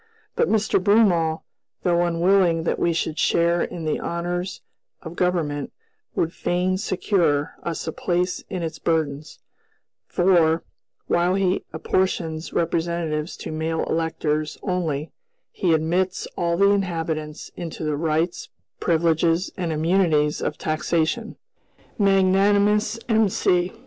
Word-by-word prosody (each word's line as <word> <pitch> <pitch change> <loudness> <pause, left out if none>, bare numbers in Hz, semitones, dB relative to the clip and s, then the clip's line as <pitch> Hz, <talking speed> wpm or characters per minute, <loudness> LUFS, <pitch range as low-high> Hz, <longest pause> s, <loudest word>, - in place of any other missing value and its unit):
But 475 0 +2
Mr. 215 -3 +2
Broomall, 180 -7 +3 0.4
though 175 -1 +2
unwilling 175 0 +3
that - - -1
we 170 - +2
should 160 -1 -2
share 170 0 +2
in 165 -2 -4
the 155 - 0
honors 175 +2 -3 0.4
of 165 -1 -8
government, 165 -6 -1 0.4
would 165 +1 0
fain 185 +1 0
secure 175 -7 +1
us 170 -1 -4
a 160 - -2
place 180 +2 -1
in 185 -3 -3
its 165 0 -5
burdens; 155 -3 -1 0.7
for, 170 -3 +3 0.4
while 175 +2 +2
he 190 -1 0
apportions 160 -1 -1
representatives 165 -1 -1
to - - -6
"male 160 +1 -1
electors" 155 -2 -1
only, 165 -5 -2 0.4
he 180 - 0
admits 170 +4 0
"all 170 -1 0
the 200 +1 +5
inhabitants" 165 -5 -2
into 165 -1 -6
the 150 -1 0
rights, 160 +3 -1 0.3
privileges, 165 +1 +2
and 175 -3 -2
immunities 155 -2 +2
of - - -2
taxation. 160 +1 -1 0.6
Magnanimous 200 +2 +3
M.C.! 190 -5 +2
170 Hz, 120 wpm, -23 LUFS, 160-185 Hz, 0.7 s, the